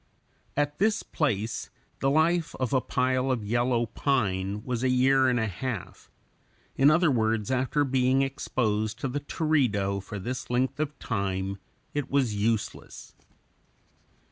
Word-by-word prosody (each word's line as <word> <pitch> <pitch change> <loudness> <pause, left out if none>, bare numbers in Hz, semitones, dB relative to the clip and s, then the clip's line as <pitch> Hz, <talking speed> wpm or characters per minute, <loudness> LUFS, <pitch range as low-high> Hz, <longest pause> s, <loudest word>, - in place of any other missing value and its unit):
At 145 0 0
this 215 +2 +2
place 115 -8 -2 0.3
the 135 - +2
life 160 +3 +2
of 130 +1 -2
a 130 - +3
pile 130 +1 0
of 120 -5 -1
yellow 120 +2 +1
pine 105 -6 -1
was 125 -1 -2
a 130 - +3
year 130 +1 +4
and 125 -1 +1
a 110 - +1
half; 105 +2 -5 0.7
in 135 +2 +5
other 165 0 +4
words, 110 -2 0
after 130 +3 +1
being 130 0 +2
exposed 110 -5 -1
to - - 0
the 135 +3 -2
teredo 125 -11 0
for 105 +2 -7
this 125 +6 -5
length 130 +3 0
of 150 -1 -2
time, 95 -2 -2 0.3
it 145 -2 -2
was 135 -6 +1
useless. 105 +1 -2
125 Hz, 145 wpm, -27 LUFS, 110-135 Hz, 0.7 s, in